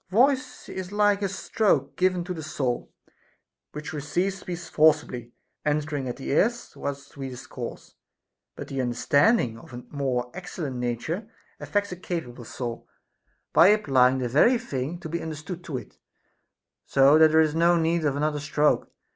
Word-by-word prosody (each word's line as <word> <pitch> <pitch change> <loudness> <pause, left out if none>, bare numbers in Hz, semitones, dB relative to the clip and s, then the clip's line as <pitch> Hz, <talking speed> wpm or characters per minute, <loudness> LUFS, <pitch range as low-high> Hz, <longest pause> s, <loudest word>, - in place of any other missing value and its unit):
Voice 260 +7 +2
is 185 0 -6
like 205 -1 +3
a 200 - 0
stroke 185 -7 0
given 185 -1 +1
to 180 +1 -4
the 165 - -6
soul, 130 -5 -3 0.8
which 150 +1 -7
receives 175 +7 -1
speech 175 -2 -6
forcibly 150 -7 +2 0.3
entering 145 -3 -1
at 120 - -5
the 135 - -5
ears 235 - +1
whilst 140 0 -6
we 135 -1 -4
discourse; 125 -1 -8 0.6
but - - -7
the 135 -1 -2
understanding 125 - +2
of 160 -1 -15
a 125 - -8
more 125 -4 -1
excellent 170 -7 -5
nature 125 - -3 0.3
affects 205 -1 -1
a - - -4
capable 165 -9 -5
soul, 120 0 -6 0.7
by 175 - +7
applying 135 -11 +4
the 130 -1 -1
very 155 - +4
thine 150 - -4
to 175 - -7
be 170 +2 -3
understood 160 +3 -6
to 145 -6 -4
it, 115 - -11 0.9
so 140 +3 +6
that 160 0 +8
there 160 +1 +4
is 155 -2 +3
no 170 +2 +4
need 165 0 +1
of 145 -2 +1
another 150 +1 0
stroke. 145 +1 +1
155 Hz, 160 wpm, -26 LUFS, 135-180 Hz, 0.9 s, that